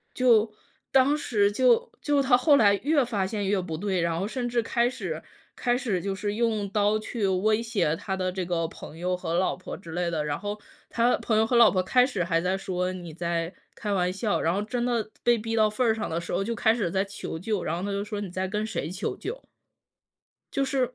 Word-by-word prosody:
就 230 -4 +4 0.4
当 270 +2 +5
时 210 -8 +1
就 245 +2 +3
就 290 -2 +2
他 260 -2 +5
后 280 +3 +5
来 205 -5 +5
越 290 -2 +3
发 205 -5 -1
现 205 -1 -2
越 195 -2 +1
不 165 -3 -5
对， 190 0 -1
然 165 -1 0
后 195 - -1
甚 240 +1 -3
至 235 -1 +1
开 235 +1 +1
始 185 -10 -5 0.3
开 240 0 +1
始 215 -9 -1
就 195 +1 -2
是 205 +2 -2
用 220 -2 0
刀 210 +1 +2
去 215 -1 -2
威 215 +4 +2
胁 215 -9 0
他 195 -1 -3
的 185 -1 -1
这 185 0 -3
个 170 -2 -1
朋 160 -1 -11
友 180 +1 -1
和 170 -2 -3
老 185 - +1
婆 185 - -8
之 170 -3 -11
类 175 0 -1
的， 155 -3 -1
然 145 -1 -2
后 205 +1 -4 0.3
他 240 +1 +3
朋 220 -2 0
友 220 - +4
和 240 +2 0
老 235 -2 +8
婆 185 -1 +1
开 250 +6 +4
始 215 -9 0
还 165 -1 +1
在 185 +2 0
说： 180 -1 -2
“你 175 -3 -8
在 170 +1 -2 0.2
开 205 -2 -3
玩 180 -1 +1
笑。” 200 +2 -1
然 165 - +2
后 195 - 0
真 240 +3 -2
的 240 -2 0
被 240 -1 +4
逼 225 +1 -3
到 215 -1 +4
份 240 +4 0
儿 220 - +4
上 220 - -3
的 165 - -1
时 170 - -7
候， 195 - +1
就 230 +2 -2
开 220 0 +3
始 210 -7 -1
在 190 +3 0
求 195 -4 -6
救， 205 +3 -2
然 165 - -1
后 180 - -4
他 205 - -2
就 200 0 -1
说： 210 -1 -5
“你 200 - -5
在 185 +1 -2
跟 210 +2 -2
谁 160 -8 -3
求 185 +3 -3
救？” - - -6 1.1
就 275 - +1
是 260 -2 -1
205 Hz, 260 characters per minute, -26 LUFS, 180-235 Hz, 1.1 s, 老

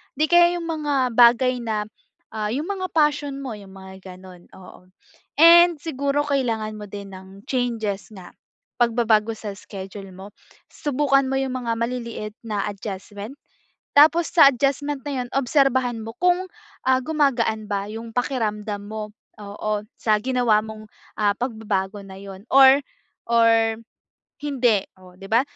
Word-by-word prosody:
'di 305 +3 +2
kaya 345 0 +5
'yung 345 - -5
mga 290 -5 0
bagay 245 +2 +4
na, 220 -3 -2 0.5
ah, 215 -1 -3
'yung 290 +5 -2
mga 375 -2 -3
passion 290 -3 +1
mo 260 - -5
'yung 195 -1 -14
mga 190 -1 -11
gano'n, 185 -1 -15
oo. 185 -1 -15 0.5
And 340 0 +7
siguro 285 -1 -1
kailangan 225 -6 -1
mo 210 - -8
din 200 0 -9
ng 190 +2 -14
changes 225 -6 -2
na 185 -4 -12 0.5
pagbabago 230 -2 +2
sa 215 -1 -7
schedule 195 -1 -9
mo. 195 +2 -11 0.4
Subukan 275 -1 +1
mo 270 - -1
'yung 270 -1 -2
mga 235 -2 -2
maliliit 235 -2 -4 0.2
na 205 -2 -2
adjustment. 205 +4 -8 0.6
Tapos 315 +3 +5
sa 305 -5 +8
adjustment 280 +2 -1
na 275 -3 -2
'yon, 245 - -8
obserbahan 260 -3 +1
mo 225 +1 -8
kung, 360 +1 +2 0.4
ah, 260 0 +4
gumagaan 250 -8 0
ba 200 0 -2
'yung 225 +1 -7
pakiramdam 215 -5 -2
mo. 215 0 -6 0.3
Oo. 205 +1 -3 0.2
Sa 215 - +2
ginawa 245 -4 +2
mong, 215 0 -9 0.3
ah, 205 -1 +2
pagbabago 210 -5 -3
na 190 - -11
'yun. 195 -1 -10
Or, 270 0 +7 0.5
or 225 -1 +3 0.6
hindi 245 -8 +1
o, 185 -1 -17
'di 195 - -10
ba? 230 +3 +4
230 Hz, 145 wpm, -22 LUFS, 205-275 Hz, 0.6 s, sa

